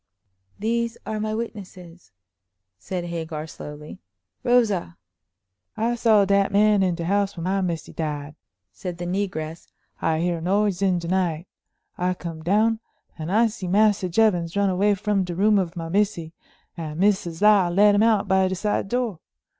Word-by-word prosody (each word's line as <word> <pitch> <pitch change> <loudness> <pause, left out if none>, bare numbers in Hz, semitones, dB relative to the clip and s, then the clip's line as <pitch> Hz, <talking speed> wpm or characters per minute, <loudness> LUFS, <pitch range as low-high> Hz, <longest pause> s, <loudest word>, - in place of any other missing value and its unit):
"These 230 +2 -1
are 215 0 -3
my 215 0 -2
witnesses," 185 - -8 0.7
said 180 - -4
Hagar, 160 -2 -5
slowly. 150 -1 -10 0.4
"Rosa!" 210 - +1 0.8
"I 230 +2 +1
saw 225 -4 +4
dat 200 0 +2
man 205 0 +4
in 185 -2 +1
de 170 -1 -4
house 200 +1 0
when 165 - -5
my 195 +2 0
missy 170 -3 -3
died," 150 -2 -4 0.4
said 175 - -6
the 175 - -5
negress. 175 -4 -3 0.3
"I 160 0 +1
hear 170 -1 -1
noise 195 +1 +1
in 190 -2 +2
de 170 -1 -5
night; 175 -3 0 0.5
I 180 +1 0
come 165 -3 -7
down, 215 +6 +2 0.4
and 160 +3 -4
I 225 +4 +4
see 215 -4 -4
Massa 200 0 +3
Jevons 180 -3 +1
run 200 -1 +2
away 200 +3 +2
from 200 0 0
de 175 -1 -5
room 205 +2 +4
of 180 -2 -3
my 165 -1 -5
missy, 180 -3 -1 0.4
and 155 -2 -6
Missus 190 -4 +1
Lyle 205 -4 +5
let 205 +4 +5
him 205 - +3
out 220 -3 +3
by 190 0 +3
de 185 - -2
side 205 +1 -1
door. 240 -7 -1
190 Hz, 165 wpm, -24 LUFS, 170-210 Hz, 0.8 s, Lyle